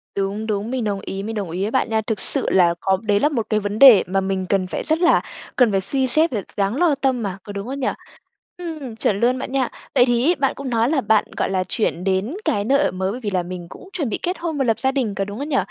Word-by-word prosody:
Đúng, 200 +2 -2
đúng, 210 +1 -2
mình 260 -2 -1
đồng 205 -2 -1
ý, 195 0 -5
mình 225 +1 -4
đồng 195 -5 -3
ý 180 +3 -3
với 210 - -1
bạn - - +1
nha. 220 -1 +1
Thực 215 -1 -3
sự - - +1
là 175 -2 +4
có, 190 0 +2
đấy 205 -2 +2
là 295 - +3
một 235 -7 -2
cái 215 - +2
vấn 205 +1 -4
đề 260 -7 +9
mà 195 +2 0
mình 190 -1 -2
cần 190 -2 +1
phải - - -4
rất 315 +1 0
là 345 -1 +4 0.3
cần 245 -4 +4
phải 195 -1 +1
suy 265 +6 0
xét 310 +6 +3
v - - -3 0.2
đáng 200 +2 0
lo 315 0 +3
tâm 265 -4 0
mà, 195 -1 -3
có 205 - -8
đúng 200 +3 -5
không 275 +2 -4
nhỉ? 265 - -1 0.7
Ừm, 310 -9 -6
chuẩn 205 -2 0
luôn 250 +3 +2
bạn - - -5
nha. 265 -2 0 0.3
Vậy 245 -2 +6
thì 240 0 +1
ấy, 350 - +4
bạn 270 -1 0
cũng 275 -1 -5
nói 230 0 +1
là 295 -3 +1
bạn, 215 -2 +3
gọi - - 0
là, 185 -1 0
chuyển 185 -5 -1
đến 195 - 0
cái 230 -11 0
nơi 275 +5 +3
ở 295 - +1
mới 190 +1 -2
bởi 245 - -5
vì 210 - -2
là 185 -2 0
mình 180 0 -7
cũng 380 - -12
chuẩn 300 -9 -2
bị 205 - -2
kết 360 +2 -1
hôn 330 -3 -3
và 275 - +1
lập 225 -2 +1
gia 265 - +1
đình, 250 -7 -1
có 195 - -1
đúng 205 +2 -7
không 290 +2 -4
nhỉ? 275 - +1
220 Hz, 300 wpm, -21 LUFS, 195-270 Hz, 0.7 s, đề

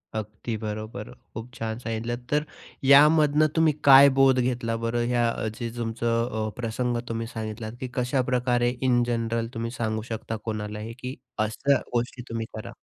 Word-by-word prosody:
अगदी 110 +1 -4
बरोबर, 110 0 -6 0.2
खूप 120 +2 -8
छान 110 -1 -4
सांगितल. 115 0 -3 0.2
तर 150 +1 +2 0.4
यामधून 150 +2 +6
तुम्ही 160 -2 +4
काय 140 0 +9
बोध 135 -1 +5
घेतला 120 -2 0
बरं, 115 +1 -1
ह्या 120 -1 +2
अ, 110 - -3
जे 120 -1 -3
तुमचं 115 -1 -1
अ, - - -2
प्रसंग 120 +1 -1
तुम्ही 115 0 -3
सांगितलात, 110 -1 -5
की 130 - -2
कशाप्रकारे 125 -1 +1
इन 120 -2 +3
जनरल 115 -1 -1
तुम्ही 115 0 -3
सांगू 110 -3 -2
शकता, 110 0 -4
कोणालाही 105 +1 -4
की 125 +1 -5 0.3
अशा 140 +6 +1 0.2
गोष्टी 120 +1 -1
तुम्ही 115 -1 -3
करा? 110 - -7
115 Hz, 155 wpm, -26 LUFS, 110-125 Hz, 0.4 s, काय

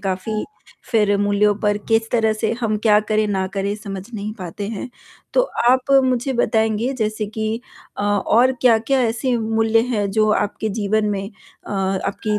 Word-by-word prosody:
काफ़ी। 200 +2 -2 0.5
फ़िर 210 -3 +3
मूल्यों 205 +1 +2
पर 205 -1 +2
किस 225 0 +2
तरह 220 -2 +2
से 215 +1 -1
हम 220 -3 0
क्या 210 -2 +5
करें 215 0 +2
ना 190 -2 0
करें 200 +1 -1
समझ 195 -3 -7
नहीं 210 +1 -4
पाते 190 +2 -6
हैं। 225 +3 -5 0.5
तो - - +5 0.3
आप 260 +1 +1
मुझे 255 +1 0
बताएँगे 225 0 +1
जैसे 215 0 -2
कि 220 +2 -3 0.4
अ, - - -3
और 210 +5 +3
क्या-क्या 245 +2 +3
ऐसे 240 +2 0
मूल्य 225 0 +2
हैं 205 -2 0
जो 215 +1 +2
आपके 210 +1 -1
जीवन 210 +1 +1
में 195 0 -3 0.4
अ, - - -8
आपकी 195 +2 -1
215 Hz, 165 wpm, -20 LUFS, 205-225 Hz, 0.5 s, क्या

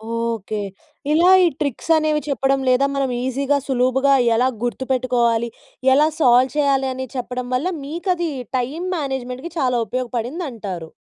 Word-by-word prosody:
Okay. 230 -2 -2 0.5
ఇలా 340 +4 +5
ఈ - - +5
tricks 290 +1 -2
అనేవి 305 -1 +1
చెప్పడం 270 0 +1
లేదా 255 +2 +4
మనం 275 -1 0
ఈజీగా, 275 +2 0
సులుభుగా 265 +1 +2 0.2
ఎలా 245 +3 +3 0.2
గుర్తుపెట్టుకోవాలి, 240 -1 0 0.4
ఎలా 295 +3 +5
సాల్వ్ 250 -2 +4
చేయాలి 275 -2 +2
అని 260 0 -5
చెప్పడం 250 0 -4
వల్ల 270 +8 0 0.2
మీకు 335 +7 -3
అది 345 -1 -2 0.3
టైమ్ 290 +9 -3
మేనేజ్మెంట్‌కి 265 +1 -4
చాలా 250 -3 +1
ఉపయోగపడింది 255 +6 -3
అంటారు. 190 -9 -7
260 Hz, 135 wpm, -20 LUFS, 245-285 Hz, 0.5 s, ఇలా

